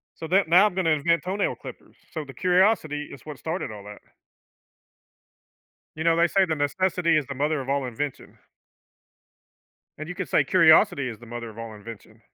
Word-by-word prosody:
So 160 - -7
that 190 +1 +3
now 180 +5 +7
I'm 205 -4 -1
gonna 185 -3 +1
invent 165 +3 +1
toenail 195 +3 -1
clippers. - - -12 0.2
So, 155 -2 -5
the 135 - -11
curiosity 180 -5 +1
is 135 - -12
what 150 -3 -8
started 160 -6 -4
all 105 -2 -10
that. 105 0 -11 2.0
You 160 - -4
know, 165 0 +4
they 170 +1 +3
say 190 +2 +2
that 165 -3 -1
necessity 170 +3 +1
is 150 - +1
the 140 - -6
mother 150 +3 0
of 130 - -6
all 140 -1 0
invention. 130 +3 -6 1.6
And 155 +1 -7
you 180 - -5
can 185 -1 -4
say 145 - +2
curiosity 160 -3 +4
is 115 -3 -8
the 120 - -14
mother 120 0 -7
of 110 0 -13
all 115 -1 -7
invention. 110 +1 -12
155 Hz, 190 wpm, -25 LUFS, 130-180 Hz, 2.0 s, now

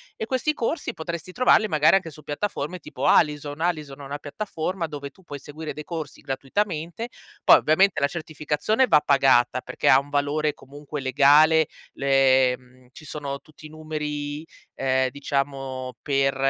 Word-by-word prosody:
e 220 - -4
questi 265 +4 0
corsi 290 +6 -2
potresti 170 +2 -6
trovarli, 220 -1 +4
magari, 155 +2 +4
anche 170 -4 -1
su 155 - -14
piattaforme 150 +2 -3
tipo 140 -4 -6
Alison, 150 -1 +2
Alison 150 -5 -2
è - - -9
una 140 +1 -6
piattaforma 170 +2 -4
dove 145 -2 -7
tu 190 +5 -24
puoi 145 -4 -8
seguire 155 +3 -7
dei 150 - -7
corsi 160 -4 -6
gratuitamente, 165 - -3 0.4
poi, - - +8
ovviamente, 185 +3 +3
la 140 - +4
certificazione 155 - 0
va 150 - +5
pagata, 130 -3 +3
perché - - -1
ha 130 - +8
un 140 +1 -9
valore 145 +1 0
comunque 145 +1 -8
legale, 150 +4 +5 0.3
le 130 -2 +3
mhmm, 125 0 -23
ci 155 - -14
sono 140 -2 -5
tutti 155 +2 -17
i - - -9
numeri, 150 -1 -5 0.3
ehm, 130 -1 +1
diciamo 135 -2 -3
per 135 -1 +1
150 Hz, 160 wpm, -24 LUFS, 140-160 Hz, 0.4 s, poi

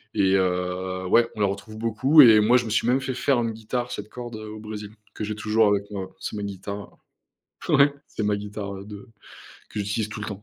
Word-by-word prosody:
et 95 -2 +3
heu, 90 0 -1
ouais, 115 +5 +4
on - - -9
la 105 - +3
retrouve 100 +2 -5
beaucoup 115 +7 +5
et 115 -5 +8
moi, 120 +4 +5
je 120 - -1
me - - -4
suis 115 - +1
même 125 +2 +3
fait 130 -1 -3
faire 125 0 +1
une 115 -1 -1
guitare 120 +3 -4
7 105 +1 -6
cordes, 120 -1 -7
heu, 110 0 -8
au 110 0 -8
Brésil 105 -1 -7 0.2
que - - -6
j'ai 105 0 -3
toujours 110 +1 +2
avec 100 0 0
moi, 95 -2 -5
c'est - - -5
ma 105 - -4
guitare, 100 +1 -7 0.7
ouais 140 +1 +5
c'est 110 - -4
ma 105 0 +1
guitare, 105 0 -6
ouais, 100 0 -8
de 105 +3 -10 0.6
que - - -7
j'utilise 105 +2 -2
tout 105 0 -7
le 105 - -4
temps. 100 -1 -7
105 Hz, 235 wpm, -24 LUFS, 100-115 Hz, 0.7 s, et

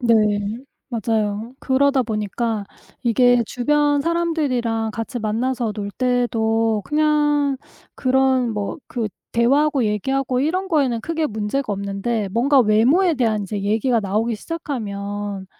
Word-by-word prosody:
네. 235 -2 +4 0.8
맞아요. 220 +1 -1
그러다 270 0 +2
보니까 215 0 -2 0.4
이게 245 0 +4
주변 290 +4 +1
사람들이랑 280 -9 0
같이 230 +3 -4
만나서 230 +1 -1
놀 205 -1 -5
때도 225 -3 +1
그냥 295 -2 +2 0.4
그런 260 -2 +2
뭐 205 +7 -3
그 230 -4 -3 0.2
대화하고 270 +3 +3
얘기하고 255 +5 0
이런 365 +6 -1
거에는 275 -9 +1
크게 320 -1 -1
문제가 220 +2 -2
없는데 200 +2 -2
뭔가 265 +5 +4
외모에 250 - +4
대한 225 -6 +1
인제 200 +1 -4
얘기가 225 +4 +1
나오기 215 +3 -1
시작하면 205 - -5
240 Hz, 280 characters per minute, -21 LUFS, 215-275 Hz, 0.8 s, 네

